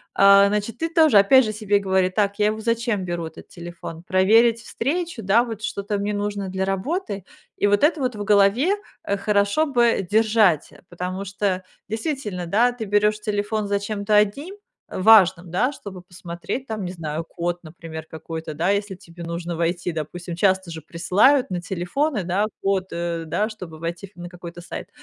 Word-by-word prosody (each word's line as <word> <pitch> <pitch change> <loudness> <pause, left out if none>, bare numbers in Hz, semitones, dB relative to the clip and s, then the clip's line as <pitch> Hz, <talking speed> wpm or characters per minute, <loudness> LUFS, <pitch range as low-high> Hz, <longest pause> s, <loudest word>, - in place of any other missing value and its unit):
а, 200 0 +7
значит, 210 +3 -2
ты 330 - -1
тоже, 320 -8 +5
опять 260 +6 +6
же, 215 - -2
себе 205 -1 +1
говори: 190 -1 +1
"Так, 200 +1 -1
я 210 - +4
его 215 +1 -2
зачем 230 -3 0
беру, 175 -1 -3
этот 160 - -13
телефон? 170 -1 -9
Проверить 225 +6 +4
встречу, 305 - -3
да, 210 +5 +4
вот 225 -3 -6
что-то 205 -1 -2
мне 205 +1 -2
нужно 205 -1 -3
для 190 0 -2
работы?" 200 - -3 0.3
И 205 - +2
вот 205 +5 +2
это 310 0 +3
вот 250 -3 -1
в 205 - -4
голове 210 - +3 0.3
хорошо 200 +7 +1
бы 235 -8 +2
держать, 215 -7 +3 0.2
потому 180 +2 -5
что 195 -1 -2 0.3
действительно, 220 - -3
да, 230 +8 +3
ты 240 -2 -6
берёшь 210 +1 +2
телефон 210 0 -2
зачем-то 200 +1 -1
одним, 245 - +1 0.4
важным, 185 -4 +5
да, 245 +10 +1
чтобы 200 -9 -9
посмотреть, 180 +7 -6
там, 220 -2 -4
не 180 - -4
знаю, 160 -2 -4
код, 175 +1 -3
например, 160 0 -9
какой-то, 160 0 -6
да, 170 +6 0
если 200 -1 -1
тебе 170 -1 -12
нужно 170 +1 -4
войти, 170 +1 -1
допустим. 170 +3 -5
Часто 190 0 +1
же 160 -1 -7
присылают 200 - +3
на 180 -1 -3
телефоны, 190 - -2
да, 190 +4 +1 0.2
код, 195 -1 0
э, 170 -1 -3
да 210 +6 0
чтобы 180 -7 -10
войти 170 +4 -5
в - - -16
на 175 - -6
какой-то 175 -1 -10
сайт. - - -8
200 Hz, 175 wpm, -23 LUFS, 175-220 Hz, 0.4 s, а